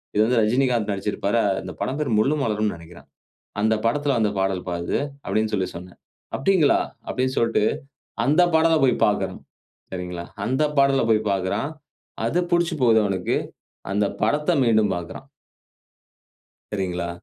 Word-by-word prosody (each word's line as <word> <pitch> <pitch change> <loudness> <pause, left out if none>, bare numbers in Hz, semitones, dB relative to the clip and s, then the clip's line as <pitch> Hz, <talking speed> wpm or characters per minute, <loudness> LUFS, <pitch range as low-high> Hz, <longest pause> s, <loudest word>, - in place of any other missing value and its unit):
இது 105 - +4
வந்து 120 +1 +2
ரஜினிகாந்த் 120 -1 +1
நடிச்சிருப்பாரு. 100 +2 -1 0.2
இந்த 90 -1 -7
படம் 130 +8 -2
பேரு 145 -6 -1
முள்ளும் 140 +7 +2
மலரும்ன்னு 105 -3 0
நெனைக்கிறேன். 85 +1 -14 0.5
அந்த 110 +1 +3
படத்துல 140 +2 +1
வந்த 105 -2 +2
பாடல்பா 95 -2 -1
இது" - - 0 0.3
அப்படின்னு 110 0 0
சொல்லி 95 -3 0
சொன்னேன். 90 +1 -10 0.4
"அப்டிங்களா?" 160 -1 +3 0.3
அப்படின் 130 0 -1
சொல்டு 115 -2 +2 0.6
அந்த 155 +6 +4
பாடலப் 160 -3 +3
போயி 125 -2 +3
பாக்கணும். 95 -3 -1 0.5
சரிங்களா, 90 -2 -5 0.2
அந்த 130 +4 0
பாடல 140 -1 +4
போயி 110 -1 +4
பாக்குறான். 95 +8 -1 0.6
அது 140 +10 +1
புடிச்சு 175 -1 +2
போவுது 115 -3 +5
அவனுக்கு, 95 -3 -1 0.6
அந்த 105 +1 +1 0.2
படத்த 150 +10 +1
மீண்டும் 110 -4 +3
பாக்குறான். 85 -1 -7 1.5
சரிங்களா. 90 -3 -2
110 Hz, 135 wpm, -23 LUFS, 95-135 Hz, 1.5 s, போவுது